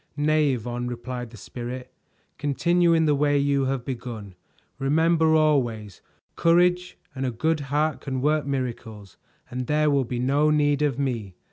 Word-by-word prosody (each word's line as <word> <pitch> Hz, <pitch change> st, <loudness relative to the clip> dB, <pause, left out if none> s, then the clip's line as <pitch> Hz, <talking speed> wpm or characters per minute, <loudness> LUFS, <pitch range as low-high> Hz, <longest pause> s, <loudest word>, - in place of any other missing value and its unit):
"Nay, 150 Hz, -1 st, +2 dB
Yvonne," 120 Hz, +1 st, -4 dB
replied 125 Hz, 0 st, -5 dB
the 115 Hz, -, -13 dB
Spirit. 125 Hz, +4 st, -7 dB, 0.5 s
"Continue 170 Hz, +4 st, +2 dB
in 160 Hz, -1 st, +3 dB
the 150 Hz, -, +3 dB
way 145 Hz, 0 st, +2 dB
you 140 Hz, -1 st, +1 dB
have 130 Hz, -2 st, -2 dB
begun; 115 Hz, -6 st, -6 dB, 0.5 s
remember 160 Hz, +3 st, +3 dB
always, 120 Hz, -10 st, +1 dB, 0.3 s
courage 180 Hz, +1 st, +2 dB, 0.2 s
and 130 Hz, 0 st, -4 dB
a 130 Hz, -, 0 dB
good 155 Hz, +7 st, 0 dB
heart 145 Hz, 0 st, -1 dB
can 130 Hz, -1 st, -3 dB
work 150 Hz, +2 st, +1 dB
miracles 115 Hz, -7 st, -5 dB, 0.3 s
and 125 Hz, 0 st, -4 dB
there 150 Hz, 0 st, +2 dB
will 140 Hz, -2 st, +2 dB
be 120 Hz, +1 st, -4 dB
no 140 Hz, +5 st, +2 dB
need 145 Hz, -1 st, +2 dB
of 145 Hz, -4 st, +1 dB
me. 115 Hz, -9 st, -3 dB
140 Hz, 155 wpm, -25 LUFS, 125-150 Hz, 0.5 s, in